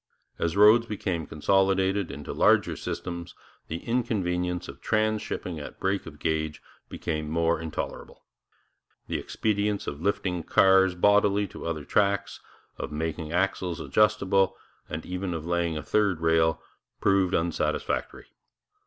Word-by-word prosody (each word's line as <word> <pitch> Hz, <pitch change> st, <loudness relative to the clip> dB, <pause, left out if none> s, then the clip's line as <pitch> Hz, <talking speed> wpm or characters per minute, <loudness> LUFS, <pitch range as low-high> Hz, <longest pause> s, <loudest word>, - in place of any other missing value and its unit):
As 85 Hz, +3 st, -1 dB
roads 110 Hz, +3 st, +7 dB
became 90 Hz, -7 st, -3 dB
consolidated 95 Hz, +3 st, +2 dB
into 70 Hz, +1 st, -6 dB
larger -, -, +3 dB
systems, 85 Hz, -1 st, -5 dB, 0.3 s
the 80 Hz, +1 st, -5 dB
inconvenience 90 Hz, -7 st, -1 dB
of -, -, -10 dB
transhipping 110 Hz, -6 st, -1 dB
at -, -, -10 dB
break 95 Hz, -1 st, -1 dB
of 75 Hz, -2 st, -10 dB
gauge 80 Hz, 0 st, -1 dB, 0.3 s
became 75 Hz, -1 st, -3 dB
more 85 Hz, 0 st, +1 dB
intolerable. 80 Hz, -1 st, -6 dB, 0.8 s
The -, -, -2 dB
expedients 105 Hz, -1 st, -1 dB
of 70 Hz, +1 st, -5 dB
lifting 90 Hz, -2 st, -1 dB
cars 95 Hz, +2 st, +4 dB
bodily 105 Hz, +2 st, +3 dB
to -, -, -7 dB
other 80 Hz, -3 st, -3 dB
trucks, 100 Hz, -1 st, +1 dB, 0.4 s
of -, -, -4 dB
making 80 Hz, +1 st, -3 dB
axles 90 Hz, -1 st, 0 dB
adjustable, 100 Hz, -3 st, +2 dB, 0.3 s
and 80 Hz, -, -5 dB
even 90 Hz, -1 st, -3 dB
of 80 Hz, -1 st, -5 dB
laying 85 Hz, -2 st, 0 dB
a -, -, -5 dB
third 100 Hz, -5 st, +1 dB
rail, 80 Hz, 0 st, +2 dB, 0.4 s
proved 95 Hz, -2 st, +2 dB
unsatisfactory. 85 Hz, 0 st, -1 dB
90 Hz, 125 wpm, -27 LUFS, 80-100 Hz, 0.8 s, roads